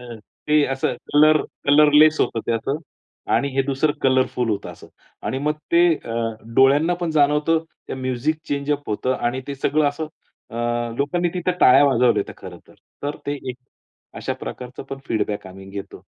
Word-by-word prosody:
अ, - - -13 0.3
ते 150 0 +4
असं 135 - -1 0.2
colour 155 +1 +6 0.2
colourless 150 +2 +6
होतं 115 - +1
ते - - +2
असं 115 +5 -1 0.5
आणि 140 - +2
हे 135 - +4
दुसरं 140 +2 +1
कलरफुल 130 -2 +1
होतं 100 -2 -2
असं. - - -14 0.4
आणि 130 - -2
मग 150 +2 0 0.2
ते 170 +1 +5
अ, 115 - -8 0.4
डोळ्यांना 145 +6 +5
पण 170 - -1
जाणवतं 150 +2 +3 0.3
ते - - -4
म्युझिक 130 +4 -1
चेंज 140 0 -1
अप 145 0 -2
होतं 125 +5 0
आणि 120 +2 -2
ते 140 - -4
सगळं 145 +2 +1
असं 155 +2 -5 0.4
अ, - - -10 0.4
लोकांनी 170 +5 0
तिथं 180 0 -1
टाळ्या 135 +3 +7
वाजवल्या 125 -3 +3
होत्या - - -8
खरंतर. 90 -2 -12 0.3
तर 145 +1 -2
ते 145 - -1
एक 125 - -4 0.6
अशा - - -3
प्रकारचं 125 +1 -8
पण 135 0 -7
फीडबॅक 105 -2 -2
आम्ही 95 +1 -12
घेतो. 100 0 -8
140 Hz, 170 wpm, -22 LUFS, 125-150 Hz, 0.6 s, टाळ्या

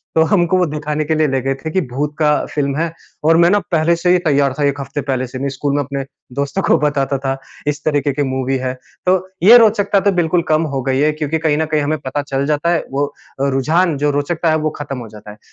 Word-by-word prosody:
तो 160 - +5
हमको 180 0 +2
वो 180 - +3
दिखाने 150 0 -3
के 160 +1 0
लिए 155 -1 +2
ले 135 -1 0
गए 135 +1 -1
थे 155 +4 -6
कि 190 - +1
भूत 145 +4 -3
का 150 -1 +3 0.2
फ़िल्म 140 -2 -1
है 165 0 -1 0.3
और 165 +1 +4
मैं 170 +1 +5
ना 205 +1 +4
पहले 165 +1 +3
से 175 +1 -1
ही 180 - +4
तैयार 140 -5 +1
था - - +1
1 140 0 -2
हफ़्ते 140 +1 -4
पहले 130 -1 -2
से 130 +1 -7
नहीं 140 0 -1
स्कूल 140 +1 -2
में 145 - +1
अपने 140 0 -4 0.3
दोस्तों 140 +7 -1
को - - +4
बताता 140 -2 0
था 135 0 0 0.3
इस 150 0 -2
तरीके 145 -2 +1
की 145 +1 0
मूवी 130 0 -1
है। 130 0 -3 0.3
तो 185 +1 +4 0.3
ये 235 +5 +9
रोचकता 205 -3 +3
तो 200 +1 +2
बिल्कुल 175 -1 +1
कम 155 +1 +3
हो 135 - -1
गई 135 0 0
है 150 +1 +3
क्योंकि 155 +1 -2
कहीं 150 -2 +1
न 160 - +1
कहीं 155 -1 0
हमें 155 +2 0
पता 145 +2 -3
चल 140 -1 -2
जाता 150 +3 0
है 165 - 0
वो 140 +1 -1 0.3
रुझान 150 +4 +1
जो 145 +1 +1
रोचकता 155 +3 -1
है 155 - +2
वो 155 0 -1
खत्म 135 -2 -5
हो 115 - -8
जाता 105 -1 -12
है। 105 - -14
150 Hz, 260 wpm, -17 LUFS, 135-160 Hz, 0.3 s, ये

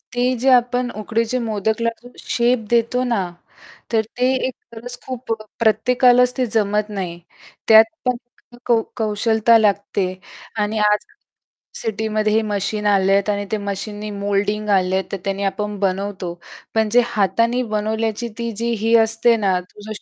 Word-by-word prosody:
ते 245 - +1 0.2
जे 265 +2 +2
आपण 245 0 +2
उकडीचे 230 +3 -1
मोदकला 220 +1 0
जो 245 - -12
शेप 240 0 +1
देतो 235 +2 +2
ना, 235 -6 0 0.7
तर 220 - +4 0.2
ते 250 +1 +2 0.2
एक 260 - -5 0.2
गरज 245 +2 -7
खूप 255 -2 -6 0.3
प्रत्येकालाच 250 +3 +4
ते 255 - +1
जमत 210 0 +1
नाही 180 -4 -5 0.5
त्यात 220 0 +9 0.2
पण 250 -1 +1 0.5
कौ 235 -2 +3 0.2
कौशलता 220 +1 +3
लागते 200 -2 +1 0.6
आणि 215 +1 -2
आज 210 0 +1 0.8
सिटीमध्ये 215 -1 -1
हे 220 - +3
मशीन 210 +1 -2
आलेत 195 0 +3
आणि 205 0 -1
ते 215 - +1
मशीननी 210 +2 -5
मोल्डिंग 205 +1 -1
आले 190 -1 +2
आहेत 190 - -2
तर 195 - -2
त्यांनी 195 0 -2
आपण 210 +1 -2
बनवतो 190 -2 -2 0.4
पण 220 -1 +2
जे 245 - +8
हाताने 230 +3 +1
बनवल्याची 220 +2 -1
ती 235 0 -3
जी 235 +1 0
ही 230 +1 +4
असते 225 +1 +2
ना 185 -1 +2
तुझ 210 +1 -13
220 Hz, 145 wpm, -20 LUFS, 205-235 Hz, 0.8 s, त्यात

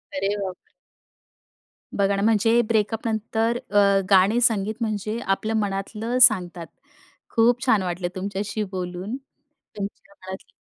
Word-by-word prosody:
अरे 195 +2 0
बाप 185 -1 -4
रे. - - -39 1.2
बघा 200 0 +2
ना, 195 - -1
म्हणजे 225 +2 +3
ब्रेकअपनंतर, 225 +1 0
अ, 200 -1 +4
गाणे, 195 +4 +5
संगीत 215 -3 +1
म्हणजे 215 +1 -2
आपलं 195 +3 -1
मनातलं 210 +4 -3
सांगतात. 180 -7 +4 0.7
खूप 240 +3 +3
छान 215 -7 +3
वाटलं 175 0 -3
तुमच्याशी 200 +3 -3
बोलून, 185 +4 -4 0.6
तुमच्या 200 0 -7
मनातलं 190 0 -9
205 Hz, 120 wpm, -23 LUFS, 195-225 Hz, 1.2 s, गाणे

